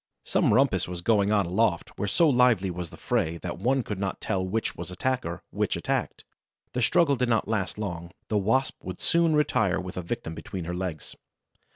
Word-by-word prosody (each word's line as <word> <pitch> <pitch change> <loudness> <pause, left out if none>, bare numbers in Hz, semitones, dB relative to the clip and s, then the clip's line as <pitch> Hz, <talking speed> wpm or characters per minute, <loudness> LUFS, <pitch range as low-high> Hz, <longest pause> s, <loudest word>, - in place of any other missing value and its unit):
Some - - +2
rumpus 110 -6 +3
was 90 -1 -5
going 105 0 +3
on 105 -3 +3
aloft, 90 0 +1
where 100 - -2
so 165 - +4
lively 125 -8 +4
was 90 -1 -5
the - - -12
fray 80 +1 0
that 85 -1 -4
one 130 +5 +1
could 105 -4 -5
not 95 -1 -2
tell 95 -3 -1
which 105 +4 -2
was - - -7
attacker, 90 -2 -2
which - - 0
attacked. - - -2 0.5
The 125 - -1
struggle 145 +5 +4
did 125 -1 0
not 115 -3 +2
last 105 -3 -1
long: 90 -5 -4 0.2
the 110 - -2
Wasp 120 +7 0
would 90 -1 -6
soon 165 -2 +3
retire 110 -10 +2
with 90 -1 -7
a - - -1
victim 85 -1 -4
between 90 +1 -6
her 90 - -3
legs. 90 -4 -5
100 Hz, 200 wpm, -27 LUFS, 90-125 Hz, 0.5 s, so